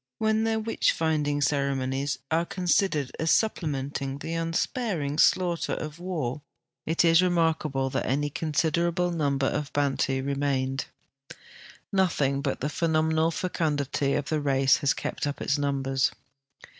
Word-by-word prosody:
When 220 0 +1
their 225 0 +1
witch 225 +1 +1
finding 150 -3 0
ceremonies 140 -1 0
are 165 +1 +2
considered 175 -5 0
as 160 - 0
supple 215 -5 +2
menting 135 -1 -3
the 165 - -5
unsiiaring 165 - -1
slaughter 175 -2 +2
of 155 +1 -5
war, 155 -7 -3 0.5
it 165 +2 +2
is 165 +1 +6
remarkable 160 -6 +1
that - - -2
any 145 +2 0
considerable 170 +3 0
number 140 -5 0
of 145 +1 -2
Bantu 135 -2 0
remained. 135 -1 -1 1.1
Nothing 150 -8 +1
but 140 -2 -2
the 140 - 0
phenomenal 160 0 +1
fecundity 145 -5 -1
of 140 - -2
the 155 -1 0
race 135 -1 +3
has 140 - +1
kept - - -3
up 145 - -4
its 140 +1 0
numbers. 135 -2 +1
150 Hz, 135 wpm, -27 LUFS, 140-165 Hz, 1.1 s, is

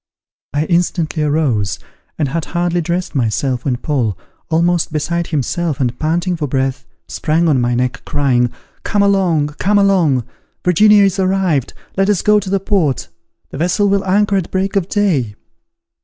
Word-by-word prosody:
I 150 +2 +1
instantly 170 -2 0
arose, 145 -10 0 0.4
and 150 - 0
had 165 +3 -2
hardly 175 0 -1
dressed 175 +2 -2
myself, 125 0 -1
when 130 -3 0
Paul, 120 - -1 0.3
almost 170 +1 +1
beside 170 +3 -2
himself, 155 +1 -2
and 125 -2 -1
panting 170 +4 0
for 150 -2 -2
breath, 135 0 -2 0.2
sprang 165 +2 0
on 140 -5 +3
my 120 0 0
neck, 125 +1 -1
crying, 125 -4 +1 0.3
"Come 205 -1 +1
along, 180 -7 +2
come 205 +2 +2
along. 180 -11 +3 0.4
Virginia 205 +4 +5
is 195 0 +1
arrived. 185 -8 0 0.2
Let 195 +1 +2
us 205 -4 +1
go 210 0 +4
to 200 - -6
the 195 0 +1
port; 180 - 0 0.4
the - - -7
vessel 180 +5 +1
will 200 0 +1
anchor 200 +1 +2
at 185 - -2
break 190 +1 -1
of 195 -2 0
day." 150 - 0
170 Hz, 160 wpm, -16 LUFS, 140-190 Hz, 0.4 s, Virginia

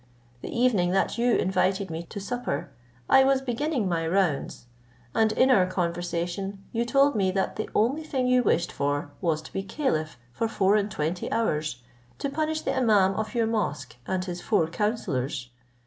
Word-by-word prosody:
The - - -6
evening 235 -8 +2
that 195 +4 +1
you 240 0 +3
invited 190 0 +1
me 160 +1 -3
to 205 - -6
supper, 200 - -3 0.4
I 265 - +6
was 270 0 +3
beginning 265 -2 -1
my 165 -2 0
rounds, 170 -9 0 0.5
and 220 -1 +3
in 260 +4 +4
our 190 -7 +5
conversation 175 +2 -3
you 235 +1 0
told 275 +3 +4
me, 195 -3 +2
that 190 +1 -1
the 215 - -4
only 255 +8 +2
thing 270 -5 -2
you 250 0 +4
wished 170 -7 +1
for 145 +1 -2
was 160 -4 0
to - - -12
be 195 - -1
caliph 195 - -2 0.2
for 225 - -1
four 200 -2 +2
and 210 -1 +1
twenty 170 -1 -3
hours, 155 - -1 0.3
to 280 - -3
punish 310 +1 -1
the - - -1
imaum 215 -8 +3
of 215 +3 -3
your 230 -1 +2
mosque 150 - -2
and 185 -1 -1
his 175 -1 -5
four 205 -6 +2
counsellors. 155 - -2
195 Hz, 180 wpm, -26 LUFS, 170-240 Hz, 0.5 s, I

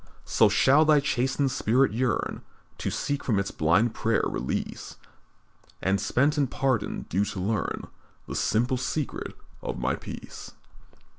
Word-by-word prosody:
"So - - +4
shall 140 +4 +5
thy 155 -1 +5
chastened 135 0 0
spirit 125 +1 +2
yearn 120 +1 -1 0.4
To - - -1
seek 145 -1 -2
from 110 -6 +1
its 100 0 -1
blind 95 +9 +2
prayer 115 -1 +1
release, 65 - -4 0.8
And 95 +1 +1
spent 140 +9 +2
and 140 -3 +2
pardoned, 130 -4 -1
sue 95 +4 +2
to 100 - -5
learn 105 +3 -2 0.4
The - - -6
simple 120 +4 +1
secret 130 +3 -3 0.3
of - - -4
My 65 +2 0
peace. - - -8
120 Hz, 140 wpm, -27 LUFS, 100-135 Hz, 0.8 s, shall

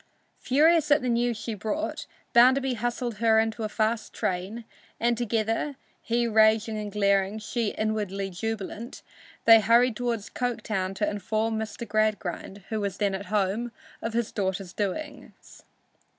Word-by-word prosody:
Furious 310 +3 +3
at 290 -2 +4
the 250 - 0
news 235 -1 +1
she 225 +1 -4
brought, 220 - -3 0.3
Bounderby 260 +2 +5
hustled 240 0 -3
her 225 -1 +4
into 225 +1 -1
a 215 - -2
fast 220 +1 -1
train, 190 +6 -3 0.3
and 235 +1 +2
together, 225 +4 -1 0.3
he 235 +1 0
raging 220 0 +3
and 210 -1 -5
glaring 200 -1 +2
and 215 0 -7
she 235 0 -1
inwardly 205 -3 -2
jubilant, 225 +4 -5 0.4
they 225 -1 +9
hurried 235 +2 +4
toward 240 -2 -1
Coketown 215 -6 -2
to 205 +2 0
inform 215 +2 -1
Mr. 220 +1 -5
Gradgrind, 205 -2 -1
who 220 -1 -2
was 200 -1 -3
then 200 -2 0
at 195 0 -5
home, 210 +4 0 0.3
of 225 - -3
his 235 -1 -1
daughter's 190 -2 -3
doings. 215 +9 -6
220 Hz, 150 wpm, -27 LUFS, 205-235 Hz, 0.4 s, they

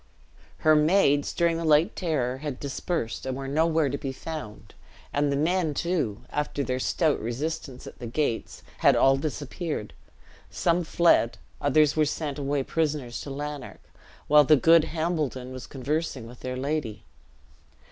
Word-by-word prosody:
Her 155 0 +7
maids, 150 -2 +3
during 170 -1 +1
the 165 - -3
late 160 +5 +3
terror, 130 -8 -1
had 145 -3 -5
dispersed, 140 -2 -3
and 130 0 -2
were 135 0 -5
nowhere 160 +2 +2
to 140 +1 -3
be 135 -3 -3
found; 140 -6 -8 0.4
and 145 0 +1
the - - +1
men, 160 +1 +1
too, 165 - -1
after 145 -1 -2
their 130 -1 -2
stout 155 +3 +1
resistance 130 +3 -4
at - - -11
the 120 - -6
gates, 120 -1 -2 0.2
had - - +5
all 135 0 +5
disappeared; 145 - -4 0.6
some 175 +1 +1
fled 165 -8 +3 0.2
others 150 +1 +3
were 155 -1 +3
sent 150 -1 -3
away 140 0 0
prisoners 145 -6 -2
to - - -7
Lanark, 145 +1 -7 0.3
while 150 0 +6
the 155 +2 +6
good 165 +3 +5
Hambledon 155 -6 -2
was 130 -1 -8
conversing 140 -1 -3
with 120 +1 -12
their 130 0 -4
lady. 140 -5 -3
145 Hz, 155 wpm, -26 LUFS, 130-160 Hz, 0.6 s, Her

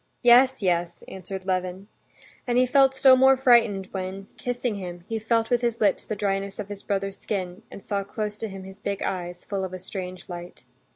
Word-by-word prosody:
"Yes, 250 0 +6
yes!" 175 -2 0
answered 190 0 -7
Levin. 185 +1 -2 0.6
And 240 0 +1
he 255 - +5
felt 270 +1 +4
still 265 0 +7
more 265 +1 +6
frightened 230 -7 +4
when, 190 +1 -5
kissing 245 -3 -2
him, 175 -2 -7
he 225 -1 -2
felt 225 +1 0
with 245 -1 +3
his 235 -1 0
lips 205 -3 +2
the 215 - -2
dryness 195 -1 -2
of 205 -1 -6
his 205 -1 -7
brother's 195 -1 -3
skin 185 -1 -4
and 200 - -11
saw 200 -1 -2
close 210 +1 -4
to 225 - -3
him 195 -1 -8
his 190 +1 -11
big 200 -1 -3
eyes, 175 -1 -4
full 195 -2 -3
of 185 -1 -5
a - - -4
strange 185 -1 -7
light. 175 -7 -9
200 Hz, 205 wpm, -25 LUFS, 185-230 Hz, 0.6 s, still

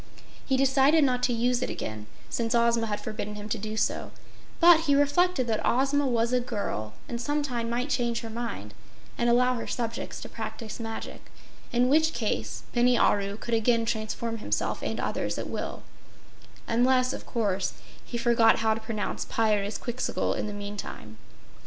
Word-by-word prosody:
He 265 - +1
decided 275 +3 +4
not 250 -2 +2
to 250 - +2
use 240 +1 +1
it - - -1
again, 105 -1 -5 0.2
since 235 0 -1
Ozma 235 -1 +3
had 210 -1 -2
forbidden 210 -1 -5
him 210 0 -7
to 225 - -1
do 215 +1 -4
so, - - 0 0.5
but 335 -1 +7
he 285 - +5
reflected 290 +1 +3
that 225 -2 0
Ozma 275 +3 +2
was 235 -1 +1
a 250 - +4
girl 205 - -3
and 235 -1 -4
some 290 +4 0
time 240 -4 -2
might 250 +4 -1
change 235 -3 0
her 225 - -6
mind 220 - -5 0.4
and 240 0 +1
allow 250 +1 +4
her 230 - -5
subjects 230 -1 -3
to - - -6
practice 225 -1 -6
magic, 225 -1 -6 0.4
in 245 +1 +3
which 315 +4 +4
case - - -2
Bini 245 0 +4
Aru 200 0 +2
could 235 +1 -5
again 230 0 +3
transform 225 +1 -2
himself - - -1
and - - -3
others - - -2
at - - -3
will, - - -5 0.8
unless, 255 +2 +3
of - - -8
course, 200 -5 -1 0.3
he 240 - -5
forgot 235 -1 +5
how 220 0 +2
to 220 - -4
pronounce 220 -3 -3
Pyrzqxgl 220 +2 0
in - - -2
the - - -4
meantime. 200 - -7
235 Hz, 170 wpm, -27 LUFS, 220-255 Hz, 0.8 s, but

